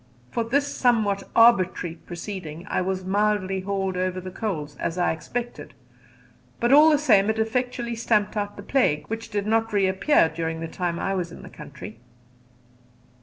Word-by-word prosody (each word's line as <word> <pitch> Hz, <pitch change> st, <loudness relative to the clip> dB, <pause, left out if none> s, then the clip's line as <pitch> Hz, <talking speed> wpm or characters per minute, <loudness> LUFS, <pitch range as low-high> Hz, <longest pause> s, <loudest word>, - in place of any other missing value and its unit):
For 235 Hz, -, -1 dB
this 275 Hz, +5 st, +1 dB
somewhat 220 Hz, -8 st, +1 dB
arbitrary 190 Hz, -7 st, +4 dB
proceeding 175 Hz, -1 st, -8 dB
I -, -, 0 dB
was 185 Hz, 0 st, -2 dB
mildly 195 Hz, -1 st, 0 dB
called 195 Hz, -1 st, -2 dB
over 185 Hz, 0 st, -1 dB
the 185 Hz, 0 st, -7 dB
coals, 160 Hz, -9 st, -4 dB
as 170 Hz, +1 st, -3 dB
I 175 Hz, -, +2 dB
expected; 240 Hz, +9 st, -6 dB, 0.8 s
but 240 Hz, +3 st, +3 dB
all 300 Hz, +2 st, +8 dB
the 300 Hz, -, +4 dB
same 210 Hz, -9 st, +4 dB
it 220 Hz, -, 0 dB
effectually 240 Hz, +1 st, -1 dB
stamped 215 Hz, -2 st, +1 dB
out 205 Hz, -1 st, -3 dB
the 200 Hz, -, -8 dB
plague, 150 Hz, -, +1 dB
which 225 Hz, +1 st, -5 dB
did 205 Hz, -1 st, -2 dB
not 225 Hz, +1 st, +1 dB
reappear 195 Hz, -, +3 dB
during 160 Hz, 0 st, -4 dB
the 165 Hz, -, -4 dB
time 175 Hz, 0 st, -3 dB
I 195 Hz, -, -1 dB
was 180 Hz, -3 st, -3 dB
in -, -, -11 dB
the -, -, -10 dB
country. 140 Hz, -7 st, -10 dB
200 Hz, 170 wpm, -24 LUFS, 180-225 Hz, 0.8 s, all